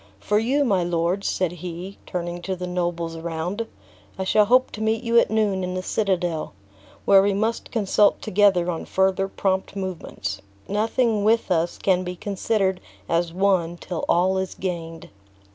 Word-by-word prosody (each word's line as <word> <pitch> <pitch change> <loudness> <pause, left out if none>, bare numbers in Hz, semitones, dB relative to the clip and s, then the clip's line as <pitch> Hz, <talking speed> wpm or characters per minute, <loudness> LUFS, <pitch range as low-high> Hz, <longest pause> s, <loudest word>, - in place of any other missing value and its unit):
For 210 - +1
you, 270 +6 +1
my 195 -7 +2
lords," 175 +3 0
said 185 -3 0
he, 180 +2 -7
turning 175 0 -4
to 190 +1 -3
the 180 0 -5
nobles 175 -2 -2
around, 170 +7 -3 0.5
"I 190 - -2
shall 210 +2 +4
hope 255 +4 +4
to 215 - -7
meet 220 +1 0
you 235 0 +4
at - - +2
noon 210 -4 +1
in 180 0 -3
the 185 - -3
citadel, 180 - -1 0.5
where 195 -1 +7
we 200 0 +1
must 220 +3 -1
consult 210 -2 +3
together 195 -4 +3
on 165 - -5
further 190 0 +1
prompt 190 0 -1
movements. 190 -3 -5 0.3
Nothing 220 +1 +1
with 225 0 +2
us 170 0 +1
can 185 -2 +1
be 180 0 -5
considered 195 0 -1 0.3
as 170 0 0
won 180 -2 +1
till 175 -1 -5
all 185 +2 +3
is 190 -1 -4
gained." 165 -3 -5
190 Hz, 165 wpm, -23 LUFS, 175-205 Hz, 0.5 s, where